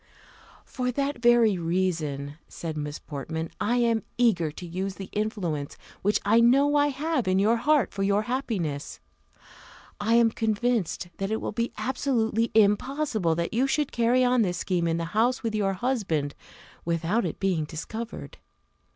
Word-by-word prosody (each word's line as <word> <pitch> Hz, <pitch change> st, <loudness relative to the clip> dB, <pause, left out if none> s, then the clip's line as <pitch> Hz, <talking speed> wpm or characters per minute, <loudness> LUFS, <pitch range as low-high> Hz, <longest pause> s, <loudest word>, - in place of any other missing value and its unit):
"For 250 Hz, -1 st, -2 dB
that 280 Hz, -1 st, -2 dB
very 235 Hz, -5 st, +5 dB
reason," 160 Hz, -5 st, -2 dB
said 165 Hz, -2 st, -6 dB
Miss 150 Hz, -1 st, -4 dB
Portman, 160 Hz, +3 st, -5 dB
"I 235 Hz, +4 st, +1 dB
am 230 Hz, -2 st, +2 dB, 0.2 s
eager 205 Hz, -10 st, +3 dB
to 175 Hz, -, -9 dB
use 190 Hz, +3 st, -4 dB
the 195 Hz, -, -9 dB
influence 185 Hz, -9 st, -3 dB, 0.2 s
which 205 Hz, +2 st, +2 dB
I 220 Hz, +3 st, +5 dB
know 275 Hz, +5 st, +4 dB
I 290 Hz, 0 st, +4 dB
have 290 Hz, -, -1 dB
in 185 Hz, 0 st, +2 dB
your 215 Hz, +4 st, +3 dB
heart 290 Hz, +2 st, +2 dB
for 195 Hz, -, -4 dB
your 200 Hz, +2 st, +2 dB
happiness. 210 Hz, -, -3 dB, 1.0 s
I 225 Hz, +3 st, +2 dB
am 235 Hz, -1 st, +5 dB
convinced 220 Hz, -5 st, -1 dB
that 195 Hz, 0 st, -2 dB
it 220 Hz, +1 st, -1 dB
will -, -, -3 dB
be 230 Hz, +3 st, -2 dB
absolutely 235 Hz, -4 st, 0 dB
impossible 220 Hz, -, +2 dB
that 170 Hz, +1 st, -2 dB
you 250 Hz, +4 st, +2 dB
should 295 Hz, +1 st, 0 dB
carry 240 Hz, +2 st, +3 dB
on 250 Hz, -1 st, +3 dB
this 180 Hz, -4 st, 0 dB
scheme 175 Hz, -2 st, 0 dB
in 165 Hz, 0 st, 0 dB
the 170 Hz, -, -2 dB
house 240 Hz, +4 st, +2 dB
with 225 Hz, -1 st, -1 dB
your 200 Hz, -2 st, +1 dB
husband 185 Hz, -, -1 dB, 0.5 s
without 170 Hz, +7 st, 0 dB
its -, -, -3 dB
being 180 Hz, -5 st, 0 dB
discovered. 220 Hz, +10 st, -7 dB
215 Hz, 160 wpm, -26 LUFS, 170-240 Hz, 1.0 s, very